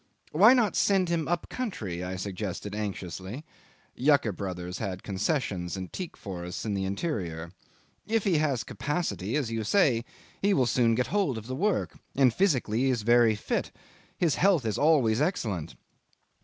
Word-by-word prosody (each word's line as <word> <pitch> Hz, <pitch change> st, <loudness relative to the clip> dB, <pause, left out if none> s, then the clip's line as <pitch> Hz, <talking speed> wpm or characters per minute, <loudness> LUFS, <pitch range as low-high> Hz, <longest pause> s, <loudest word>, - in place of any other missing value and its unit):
"Why 210 Hz, +11 st, +7 dB
not 225 Hz, -6 st, +2 dB
send 190 Hz, -3 st, +3 dB
him 165 Hz, -2 st, 0 dB
up 175 Hz, 0 st, -1 dB
country?" 105 Hz, -, -4 dB
I 90 Hz, +1 st, -4 dB
suggested 100 Hz, +1 st, -4 dB
anxiously. 100 Hz, -, -5 dB, 0.5 s
(Yucker 135 Hz, -7 st, +3 dB
Brothers 90 Hz, -1 st, -5 dB
had 95 Hz, -4 st, -4 dB
concessions 95 Hz, -, -1 dB
and 95 Hz, -2 st, -7 dB
teak 180 Hz, -3 st, -6 dB
forests 90 Hz, -2 st, -6 dB
in 105 Hz, -, -1 dB
the 95 Hz, -1 st, -1 dB
interior.) 95 Hz, -, -3 dB, 0.6 s
"If 225 Hz, -1 st, +1 dB
he 175 Hz, -6 st, +2 dB
has 140 Hz, -6 st, 0 dB
capacity, 145 Hz, -, -2 dB
as 135 Hz, -7 st, -1 dB
you 115 Hz, -1 st, -2 dB
say, 125 Hz, -, +3 dB, 0.4 s
he 200 Hz, 0 st, +3 dB
will 130 Hz, -, +3 dB
soon 115 Hz, -1 st, +3 dB
get 125 Hz, +1 st, +1 dB
hold 190 Hz, -, +1 dB
of 110 Hz, -, -7 dB
the 130 Hz, -, -5 dB
work. 200 Hz, +9 st, 0 dB, 0.2 s
And 130 Hz, -4 st, +4 dB
physically 130 Hz, -, +1 dB
he 135 Hz, +1 st, +2 dB
is 120 Hz, -4 st, 0 dB
very 120 Hz, -1 st, +5 dB
fit. 105 Hz, -, -2 dB, 0.5 s
His 165 Hz, -5 st, +2 dB
health 180 Hz, -9 st, +4 dB
is 110 Hz, -, -1 dB
always 140 Hz, -6 st, +4 dB
excellent." 105 Hz, -, -1 dB
120 Hz, 165 wpm, -28 LUFS, 95-160 Hz, 0.6 s, Why